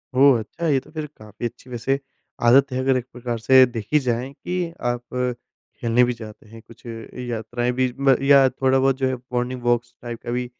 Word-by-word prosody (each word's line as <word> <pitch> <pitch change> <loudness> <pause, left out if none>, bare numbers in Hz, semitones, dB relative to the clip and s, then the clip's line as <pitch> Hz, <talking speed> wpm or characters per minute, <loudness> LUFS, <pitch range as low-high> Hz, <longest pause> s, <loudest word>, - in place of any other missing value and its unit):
ओह 135 -2 +6
अच्छा! 165 +10 -5
ये 140 -4 +3
तो - - -18
फिर 155 -1 -4
काफ़ी 110 +2 -8
अच्छी 120 +2 -7
वैसे 125 +3 -1 0.5
आदत 135 +3 +6
है 130 - -2
अगर 130 0 +2
एक 125 - -4
प्रकार 120 -1 -4
से 130 +3 +7
देखी 120 +4 -1
जाए 125 -1 -1
कि 175 +2 -3
आप 120 0 -1 0.8
खेलने 120 +1 +3
भी 125 0 +1
जाते 110 -2 -11
हैं, 115 +1 -12
कुछ 115 +1 -17
यात्राएँ 120 +1 -4
भी 130 0 0
म 135 -1 +5
या 140 -1 +6
थोड़ा-बहुत 130 +1 +2
जो 130 -1 +1
है 130 - -1 0.2
मॉर्निंग 125 +1 -2
वॉक्स 120 0 0
टाइप 120 -1 -6
का 120 - -4
भी 125 +1 -1
125 Hz, 200 wpm, -22 LUFS, 120-135 Hz, 0.8 s, से